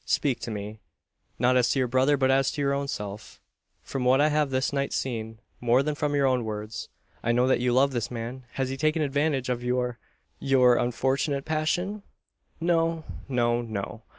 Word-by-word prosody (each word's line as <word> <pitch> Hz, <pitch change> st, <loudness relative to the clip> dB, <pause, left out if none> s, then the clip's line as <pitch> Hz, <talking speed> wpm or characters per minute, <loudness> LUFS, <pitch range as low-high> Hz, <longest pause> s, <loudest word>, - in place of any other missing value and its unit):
Speak 140 Hz, -5 st, 0 dB
to -, -, -5 dB
me, 105 Hz, 0 st, -6 dB, 0.6 s
not 125 Hz, +2 st, +3 dB
as 125 Hz, -1 st, +3 dB
to -, -, +1 dB
your 130 Hz, -1 st, +2 dB
brother, 130 Hz, +4 st, +3 dB
but 130 Hz, -1 st, +3 dB
as 135 Hz, 0 st, +3 dB
to -, -, -6 dB
your 140 Hz, 0 st, +1 dB
own 140 Hz, 0 st, -1 dB
self. 105 Hz, -5 st, -6 dB, 0.4 s
From 135 Hz, -2 st, -4 dB
what 130 Hz, +2 st, +4 dB
I 150 Hz, +1 st, +4 dB
have 150 Hz, -1 st, +1 dB
this 130 Hz, +1 st, 0 dB
night 140 Hz, 0 st, -1 dB
seen, 115 Hz, -3 st, -3 dB, 0.2 s
more 125 Hz, +2 st, +3 dB
than 150 Hz, +1 st, -1 dB
from 145 Hz, 0 st, -1 dB
your 140 Hz, -1 st, +3 dB
own 130 Hz, -2 st, +2 dB
words, 105 Hz, 0 st, -5 dB, 0.3 s
I 120 Hz, -, +1 dB
know 125 Hz, +1 st, +3 dB
that 130 Hz, -, +3 dB
you 125 Hz, 0 st, +1 dB
love 135 Hz, +3 st, +4 dB
this 120 Hz, -4 st, -2 dB
man. 120 Hz, +2 st, -6 dB
Has 135 Hz, -1 st, -1 dB
he 135 Hz, -, -4 dB
taken 155 Hz, +3 st, +1 dB
advantage 145 Hz, -2 st, 0 dB
of 125 Hz, -1 st, -2 dB
your 125 Hz, -1 st, -1 dB, 0.4 s
your 130 Hz, -3 st, +4 dB
unfortunate 135 Hz, +4 st, 0 dB
passion?" 175 Hz, +6 st, -1 dB, 0.6 s
"No 165 Hz, -1 st, +1 dB, 0.3 s
no 120 Hz, -2 st, +1 dB
no. 110 Hz, 0 st, -5 dB
130 Hz, 195 wpm, -26 LUFS, 120-140 Hz, 0.6 s, what